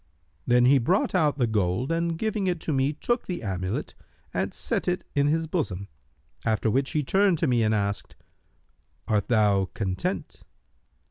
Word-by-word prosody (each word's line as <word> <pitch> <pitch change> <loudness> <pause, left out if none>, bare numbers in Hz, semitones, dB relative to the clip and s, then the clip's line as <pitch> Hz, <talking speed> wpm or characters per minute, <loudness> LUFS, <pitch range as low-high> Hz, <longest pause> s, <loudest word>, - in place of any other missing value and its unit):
Then 125 0 +5
he 135 +2 +6
brought 180 - +1
out 155 -6 +2
the 125 - +2
gold 105 - 0
and 165 0 0
giving 215 -1 -1
it 175 -2 0
to 155 - -2
me 135 +1 +2
took 240 - -2
the 175 -7 -4
amulet, 95 -1 -3 0.4
and - - -1
set - - -2
it 180 0 0
in 140 0 +2
his 160 +2 +1
bosom; 110 - -3 0.5
after 110 0 +1
which 135 +4 +1
he 150 - +1
turned 190 +4 +3
to 165 - 0
me 120 -2 +2
and 110 0 +2
asked, 100 -1 -2 0.9
'Art 105 -2 +1
thou 105 -5 +3
content?' 105 - -3
135 Hz, 165 wpm, -26 LUFS, 105-165 Hz, 0.9 s, he